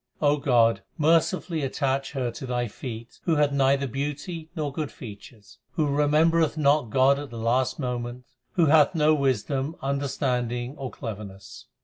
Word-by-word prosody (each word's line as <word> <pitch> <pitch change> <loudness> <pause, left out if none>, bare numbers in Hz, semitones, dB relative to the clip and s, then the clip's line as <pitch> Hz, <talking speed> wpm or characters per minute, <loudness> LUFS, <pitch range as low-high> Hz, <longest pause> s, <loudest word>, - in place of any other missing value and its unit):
God, 125 -8 +3 0.2
mercifully 165 +1 +2
attach 135 0 -1
her 130 -4 -1
to 130 - -8
Thy 120 -1 -1
feet 115 +1 -8
Who 165 - +2
hath 145 -1 +3
neither 140 0 +2
beauty 150 +5 -4
nor 150 -4 -3
good 150 -1 -3
features, 105 -2 -12
Who 160 -3 +1
remembereth 150 +3 +2
not 145 -4 +3
God 135 +4 +4
at 145 -1 -7
the 115 - -8
last 120 +3 +1
moment, 125 -2 -4 0.3
Who 170 - +3
hath 155 +2 +5
no 155 0 +4
wisdom, 140 +1 0
understanding, 130 -2 -2
or 135 -3 -5
cleverness. 105 +1 -9
135 Hz, 145 wpm, -26 LUFS, 120-150 Hz, 0.3 s, hath